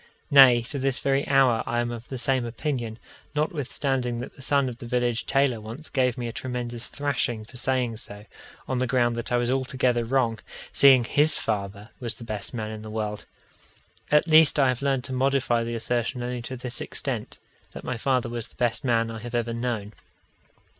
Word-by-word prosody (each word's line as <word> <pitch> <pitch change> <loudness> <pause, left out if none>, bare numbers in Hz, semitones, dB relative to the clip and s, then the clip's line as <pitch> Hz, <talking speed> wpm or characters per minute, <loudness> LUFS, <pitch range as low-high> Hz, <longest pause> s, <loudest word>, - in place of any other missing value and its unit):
Nay, 130 -4 +8
to 140 +4 -4
this 135 0 +1
very 135 0 0
hour 130 -4 +4
I 120 0 0
am 120 0 -1
of 115 0 -7
the 130 - -5
same 130 +1 +1
opinion, 120 -2 -3 0.4
notwithstanding 135 -5 -1
that 120 - -7
the - - -14
son 140 0 +2
of 120 -1 -6
the 120 - -8
village 120 -1 0
tailor 135 -4 +2
once 115 +9 -9
gave 125 -3 +1
me 120 -1 -3
a - - -4
tremendous 120 -1 -5
thrashing 125 -6 -2
for 120 - -16
saying 125 -2 0
so, 105 -2 -8 0.4
on 130 - -1
the 130 - 0
ground 120 -1 +2
that 115 +1 -5
I 120 - +3
was 120 0 0
altogether 130 -2 +1
wrong, 115 -2 +1 0.3
seeing 135 -3 +7
his 150 +6 +3
father 100 0 -3
was 120 -3 -1
the 120 - -11
best 105 -3 -5
man 110 -3 -4
in 110 -1 -7
the 110 - -8
world 105 -1 -4 0.8
at 150 0 +4
least 160 -1 +6
I 135 -3 +4
have 125 0 -1
learned 135 -2 +1
to 130 - -3
modify 130 -2 +1
the 115 0 -3
assertion 120 +1 -1
only 125 0 -3
to 130 +2 -6
this 125 0 -3
extent - - -3 0.4
that - - -8
my 125 - -3
father 125 +1 0
was 120 -1 -4
the - - -24
best 120 -2 0
man 115 -3 +1
I 110 - -6
have 120 +2 -6
ever 120 -1 -1
known. 115 -3 -3
120 Hz, 200 wpm, -25 LUFS, 115-130 Hz, 0.8 s, Nay